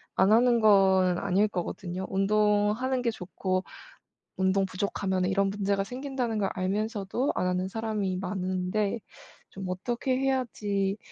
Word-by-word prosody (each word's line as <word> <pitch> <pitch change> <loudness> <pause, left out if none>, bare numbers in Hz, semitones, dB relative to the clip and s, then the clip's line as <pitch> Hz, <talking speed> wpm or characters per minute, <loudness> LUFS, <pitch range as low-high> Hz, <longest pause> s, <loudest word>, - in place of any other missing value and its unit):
안 190 +2 +4
하는 240 +1 +5
거는 190 -4 +5
아닐 200 +2 +2
거거든요. 180 -1 -4
운동하는 210 +5 +2
게 235 -1 +1
좋고 185 -1 -3 0.7
'운동 190 +1 +2
부족하면 190 -1 -1
이런 195 +1 +2
문제가 200 0 0
생긴다.'는 250 0 -3
걸 195 -2 0
알면서도 205 +5 -1
안 180 - 0
하는 180 +1 0
사람이 210 -3 -2
많은데 185 +3 -1 0.5
좀 195 -1 -7
어떻게 240 +7 -1
해야지 210 -7 -1
200 Hz, 290 characters per minute, -28 LUFS, 190-220 Hz, 0.7 s, 하는